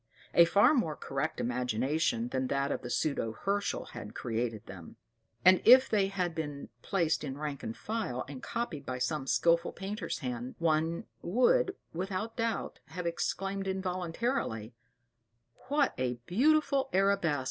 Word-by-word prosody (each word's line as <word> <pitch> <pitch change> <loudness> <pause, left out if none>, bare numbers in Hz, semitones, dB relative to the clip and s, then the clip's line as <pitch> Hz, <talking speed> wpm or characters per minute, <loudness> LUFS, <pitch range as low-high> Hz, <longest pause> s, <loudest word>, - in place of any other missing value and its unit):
A 170 - +8
far 200 - +5
more 195 - +1
correct 135 +3 -3
imagination 125 +1 0
than 130 0 -1
that 140 +1 0
of - - -2
the 120 - -6
pseudo 130 -6 0
Herschel* 200 - -1
had 105 - -9
created 115 -2 -2
them; 95 -4 -10 0.5
and 185 0 +7
if 255 +2 +8
they 205 -5 +2
had 185 -3 -2
been 145 -3 -5
placed 170 -5 0
in 135 -2 -4
rank 145 -2 -4
and 110 +1 -5
file, 210 - -3
and 135 -2 -8
copied 205 -12 -3
by 130 -2 -4
some 140 +1 -2
skilful 170 +4 +3
painter's 200 +3 -4
hand, 125 -2 -5
one 165 0 +1 0.2
would, 385 - +3 0.2
without 195 +6 -3
doubt, 230 -2 -2
have 180 -1 -6
exclaimed 195 +3 -2
involuntarily, 185 - -2 0.9
"What 285 0 +2
a 125 -1 0
beautiful 275 - +3
arabesque!" 195 -6 +2
170 Hz, 145 wpm, -31 LUFS, 130-200 Hz, 0.9 s, A